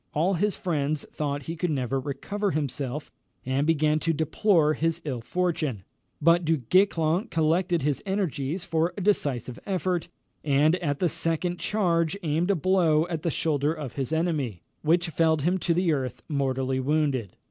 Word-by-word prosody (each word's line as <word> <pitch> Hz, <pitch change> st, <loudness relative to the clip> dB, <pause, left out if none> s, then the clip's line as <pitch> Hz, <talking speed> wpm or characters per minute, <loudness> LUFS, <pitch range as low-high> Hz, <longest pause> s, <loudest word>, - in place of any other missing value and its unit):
All 170 Hz, +6 st, +2 dB
his 200 Hz, +3 st, 0 dB
friends 155 Hz, -4 st, -1 dB
thought 145 Hz, -1 st, -3 dB
he 165 Hz, +5 st, -5 dB
could 175 Hz, +2 st, -1 dB
never 135 Hz, -2 st, -1 dB
recover 195 Hz, +10 st, -3 dB
himself, 145 Hz, -2 st, -3 dB, 0.3 s
and 135 Hz, +3 st, 0 dB
began 155 Hz, -1 st, +2 dB
to 165 Hz, +1 st, 0 dB
deplore 160 Hz, +1 st, +2 dB
his 165 Hz, +1 st, 0 dB
ill 130 Hz, -5 st, -3 dB
fortune; 155 Hz, -, -1 dB, 0.4 s
but 170 Hz, +3 st, +4 dB
Du 160 Hz, 0 st, +2 dB
Guesclin 175 Hz, -, +2 dB
collected 165 Hz, +1 st, +1 dB
his 145 Hz, -1 st, 0 dB
energies 180 Hz, -5 st, -2 dB
for 165 Hz, +2 st, 0 dB
a -, -, -3 dB
decisive 135 Hz, -, 0 dB
effort, 185 Hz, -3 st, -1 dB, 0.4 s
and 150 Hz, +3 st, +3 dB
at 145 Hz, -5 st, -2 dB
the 180 Hz, -, +2 dB
second 165 Hz, +2 st, -1 dB
charge 170 Hz, -4 st, +1 dB
aimed 160 Hz, +3 st, 0 dB
a 200 Hz, -, +4 dB
blow 165 Hz, -2 st, +3 dB
at 165 Hz, -3 st, -3 dB
the 170 Hz, -, 0 dB
shoulder 150 Hz, -2 st, 0 dB
of 145 Hz, -6 st, -6 dB
his 135 Hz, +1 st, -3 dB
enemy, 150 Hz, -, -1 dB, 0.2 s
which 170 Hz, +2 st, +2 dB
felled 160 Hz, -1 st, +2 dB
him 180 Hz, +4 st, +1 dB
to 170 Hz, -, 0 dB
the 170 Hz, -1 st, +2 dB
earth, 130 Hz, -4 st, -3 dB
mortally 135 Hz, -2 st, 0 dB
wounded. 135 Hz, -, 0 dB
160 Hz, 165 wpm, -26 LUFS, 145-175 Hz, 0.4 s, but